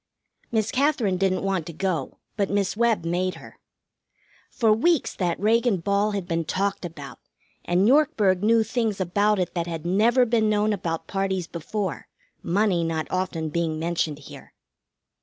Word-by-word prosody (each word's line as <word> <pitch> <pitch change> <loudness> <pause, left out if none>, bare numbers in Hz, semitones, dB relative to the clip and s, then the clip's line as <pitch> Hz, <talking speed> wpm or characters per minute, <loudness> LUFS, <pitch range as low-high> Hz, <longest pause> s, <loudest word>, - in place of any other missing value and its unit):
Miss 220 -2 0
Katherine 255 -9 +1
didn't 190 -1 +1
want 190 -4 -1
to 170 - -7
go, 165 -5 -2 0.2
but 200 -2 0
Miss 200 -1 0
Webb 225 -6 +1
made 180 +2 -1
her. - - -14 0.9
For 225 -4 +2
weeks 320 +7 +2
that 175 -3 -2
Reagan 225 +1 +2
ball 200 +4 0
had 195 -3 -3
been 165 -1 -1
talked 195 +6 -2
about, 150 -5 -9 0.5
and 180 +3 +2
Yorkburg 235 - +3
knew 225 +1 +4
things 220 -2 -1
about 205 +4 +1
it 180 -2 -2
that 170 -1 -2
had 165 -1 -5
never 225 +8 +3
been 225 -2 +2
known 210 0 +2
about 165 -4 -3
parties 195 -2 -2
before, 185 +4 -4 0.3
money 185 -1 +1
not 160 -1 -2
often 180 -4 -2
being 160 0 -1
mentioned 165 -2 -1
here. 145 - -13
195 Hz, 160 wpm, -24 LUFS, 170-215 Hz, 0.9 s, knew